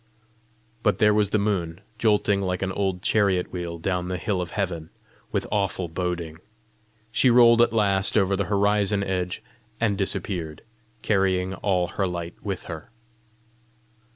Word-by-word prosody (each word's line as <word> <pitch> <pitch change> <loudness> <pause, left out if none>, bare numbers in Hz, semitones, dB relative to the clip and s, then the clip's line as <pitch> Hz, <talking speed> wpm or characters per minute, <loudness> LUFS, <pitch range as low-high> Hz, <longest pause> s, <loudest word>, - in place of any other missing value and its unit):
But 105 -5 +2
there 105 -1 +4
was 105 -2 +2
the 110 - +2
moon 95 -5 -1 0.2
jolting 105 -2 +2
like 90 0 -2
an 95 - -1
old 95 -2 -2
chariot 100 -4 +1
wheel 85 -2 -4
down 90 +1 -2
the 90 0 -2
hill 95 -1 -1
of 90 - -4
heaven, 85 -6 -3 0.4
with - - -1
awful 100 -3 0
boding! 85 -2 -4 0.7
She 130 - +3
rolled 120 -1 +6
at 120 - +4
last 100 -2 +2
over 95 -1 +3
the 100 0 -1
horizon 100 +1 +2
edge 90 -2 -3 0.4
and 110 -3 +1
disappeared, 90 -5 -3 0.4
carrying 95 -2 +1
all 95 -2 0
her 95 - -1
light 85 -1 -5
with 100 -3 -4
her. 80 -2 -8
95 Hz, 150 wpm, -25 LUFS, 90-105 Hz, 0.7 s, rolled